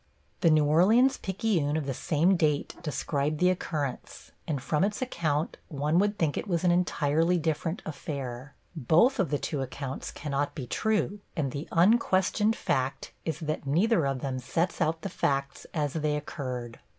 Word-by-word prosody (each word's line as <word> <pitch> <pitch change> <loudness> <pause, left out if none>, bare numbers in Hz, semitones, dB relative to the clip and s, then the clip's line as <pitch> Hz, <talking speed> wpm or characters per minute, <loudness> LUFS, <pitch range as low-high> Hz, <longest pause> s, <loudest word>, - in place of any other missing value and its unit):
The 170 - +4
New 155 -1 +4
Orleans 210 - +5
Picayune 185 -7 0
of 155 - -2
the 135 - -2
same 165 +8 +2
date 150 -4 +1
described 150 -1 -1
the 180 0 +4
occurrence, 150 -7 -4 0.2
and 145 -4 -1
from 150 +5 0
its 205 +1 0
account 160 - -1
one 150 +3 +1
would 205 +1 +1
think 160 -6 +1
it - - -6
was 175 -3 0
an 180 - +4
entirely 165 -1 +2
different 160 +3 -2
affair. 140 -4 -6 0.2
Both 170 - +3
of 185 -6 +2
the 145 - +1
two 145 0 -3
accounts 135 +1 -5
cannot 145 -1 -3
be 135 - -5
true, 210 - 0 0.2
and 145 -5 -1
the 145 +4 -5
unquestioned 205 +3 +3
fact 130 0 -2
is 160 -1 -3
that 155 -2 -3
neither 170 +2 +3
of 135 -2 -2
them 130 -2 -2
sets 165 +9 -1
out 160 0 0
the - - -1
facts 140 -6 -2
as 145 -4 -1
they 150 -2 0
occurred. 125 -5 -5
155 Hz, 170 wpm, -28 LUFS, 140-180 Hz, 0.2 s, Orleans